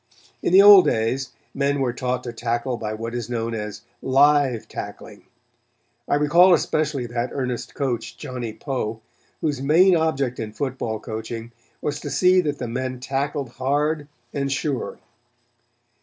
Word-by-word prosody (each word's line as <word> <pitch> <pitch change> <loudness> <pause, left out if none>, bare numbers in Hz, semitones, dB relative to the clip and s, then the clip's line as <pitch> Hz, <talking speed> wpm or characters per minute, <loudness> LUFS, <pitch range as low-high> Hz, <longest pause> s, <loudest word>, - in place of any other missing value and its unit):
In - - 0
the 190 +2 +8
old 200 -2 +10
days 120 +4 0 0.2
men 140 +1 0
were 125 -3 0
taught 125 0 -2
to 120 - -6
tackle 120 +2 -2
by 110 -2 -4
what 115 +2 -5
is 120 -1 -4
known 115 -1 -2
as 105 -1 -5 0.2
"live 135 -3 +3
tackling." - - -8 0.8
I - - +2
recall 170 +5 +6
especially 150 -6 -1
that 120 +1 -2
earnest 125 -3 -4
coach, 120 -4 -3
Johnny 125 -2 -5
Poe, 115 -3 -4 0.4
whose 145 -4 -1
main 175 +7 +5
object 140 -6 0
in 110 -1 -5
football 130 -5 -3
coaching 110 +2 -6 0.3
was 145 -1 -2
to 145 - -6
see 180 +6 +4
that 145 -4 -2
the 125 - -4
men 130 +2 -3
tackled 135 +1 -2
hard 145 +4 -1 0.3
and 140 -1 -1
sure. 140 -1 -2
130 Hz, 150 wpm, -23 LUFS, 120-145 Hz, 0.8 s, old